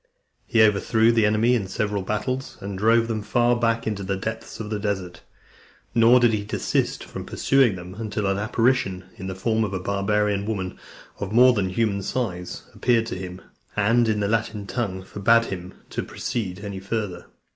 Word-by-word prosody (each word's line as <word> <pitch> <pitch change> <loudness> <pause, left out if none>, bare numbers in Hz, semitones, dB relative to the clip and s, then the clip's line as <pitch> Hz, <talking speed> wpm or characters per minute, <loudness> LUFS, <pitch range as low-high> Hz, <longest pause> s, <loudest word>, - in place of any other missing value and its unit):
He 115 -2 +5
overthrew 110 +2 +4
the 115 -2 +3
enemy 110 +3 +3
in 110 -6 0
several 100 +1 -1
battles, 115 +7 -3
and 100 0 -5
drove 115 +3 +3
them 110 -2 -2
far 120 +3 +2
back 115 -1 0
into 105 -2 -2
the 95 0 -2
depths 110 +3 -5
of 110 -1 -5
the 105 - -1
desert. 95 -4 -3 0.7
Nor 120 +1 +6
did 120 -2 +4
he 105 -1 0
desist 105 - -1
from - - -7
pursuing 135 -7 +2
them, 90 0 -8
until 105 0 -3
an 95 0 +1
apparition, 110 -4 +1
in 95 - -6
the 95 - -4
form 110 +3 +1
of 100 -3 -2
a - - -1
barbarian 100 +1 0
woman, 95 -4 -3 0.4
of 100 -1 -4
more 125 +3 +7
than 100 -5 0
human 100 0 0
size, 95 -5 -3
appeared 115 -2 +2
to - - -4
him, 90 0 -7 0.3
and, 115 +3 +3
in 105 -1 +1
the 100 - +1
Latin 110 -1 -1
tongue, 100 -5 -3
forbad 115 +4 +3
him 90 -3 -6 0.2
to - - -2
proceed 100 -5 -4
any 100 -2 -5
farther. 100 -3 -4
105 Hz, 185 wpm, -24 LUFS, 95-115 Hz, 0.7 s, more